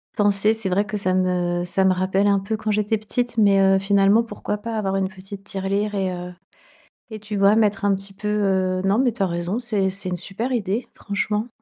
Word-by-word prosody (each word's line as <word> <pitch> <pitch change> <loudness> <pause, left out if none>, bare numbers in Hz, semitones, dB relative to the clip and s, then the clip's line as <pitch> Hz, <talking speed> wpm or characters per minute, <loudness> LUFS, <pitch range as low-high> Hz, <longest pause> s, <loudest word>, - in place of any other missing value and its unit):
pensé, 205 0 +3
c'est 220 -4 -3
vrai 200 +3 +1
que 210 0 -4
ça 185 -2 0
me 180 -1 0
ça 185 +2 0
me 190 - +4
rappelle 190 +2 +1
un 200 -1 +3
peu 215 +3 -3
quand 215 0 -4
j'étais 210 +1 +1
petite 240 +2 -3
mais 200 -2 +5
heu, 195 0 +4
finalement, 200 +2 +4
pourquoi 210 -1 -4
pas 230 0 -4
avoir 195 -2 -1
une 190 -1 0
petite 195 +1 -10
tirelire 200 +1 -2
et 190 -2 0
heu 180 0 -6 0.8
et 220 - -6
tu 210 0 -7
vois? 200 +2 +4
Mettre 210 -2 +1
un 200 - +3
petit 195 +1 -7
peu, 210 +2 -5
heu 190 -3 +1
non, 195 +3 +2
mais 260 -2 +3
tu 220 - -3
as - - +3
raison, 175 +4 -2
c'est 215 -6 0
c'est 190 0 -4
une 180 - -2
super 220 +8 -4
idée, 220 0 -1
franchement. 210 +2 -2
200 Hz, 225 wpm, -22 LUFS, 190-210 Hz, 0.8 s, mais